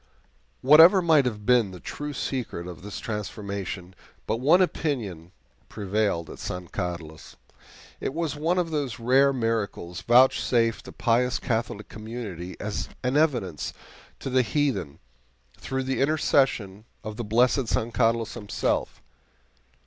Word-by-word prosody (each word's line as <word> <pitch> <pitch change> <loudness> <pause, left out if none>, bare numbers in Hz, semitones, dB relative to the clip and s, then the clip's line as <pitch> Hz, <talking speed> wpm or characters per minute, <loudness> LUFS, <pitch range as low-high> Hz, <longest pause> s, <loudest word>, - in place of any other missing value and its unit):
Whatever 160 +7 +8
might 155 -5 +5
have 105 -4 -3
been 120 -4 +4
the 90 -1 -10
true 145 +9 -6
secret 125 -10 -4
of 90 -1 -9
this 100 +1 -7
transformation, 100 -3 -5 0.3
but 110 - -1
one 145 +9 +4
opinion 115 - -1 0.4
prevailed 100 -4 -1
at - - -11
San 90 -1 -5
Carlos. 85 -4 -6 0.6
It 135 - -3
was 165 -3 -2
one 165 +5 0
of 175 -2 0
those 140 -6 -2
rare 130 +4 +4
miracles 115 -8 -2
vouchsafed 120 -2 +3
a - - -8
pious 120 -1 +1
Catholic 110 -2 -2
community 105 -5 -7
as 105 0 -4
an 125 +2 0
evidence 120 - 0 0.5
to 135 - -4
the 130 0 +4
heathen, 115 - -1 0.6
through 130 0 -3
the 130 0 -1
intercession 130 -8 +1 0.2
of 110 0 -6
the 120 - -3
blessed 120 +4 +2
San 115 +1 -1
Carlos 115 -1 +1
himself. 105 -3 -2
115 Hz, 135 wpm, -26 LUFS, 100-135 Hz, 0.6 s, Whatever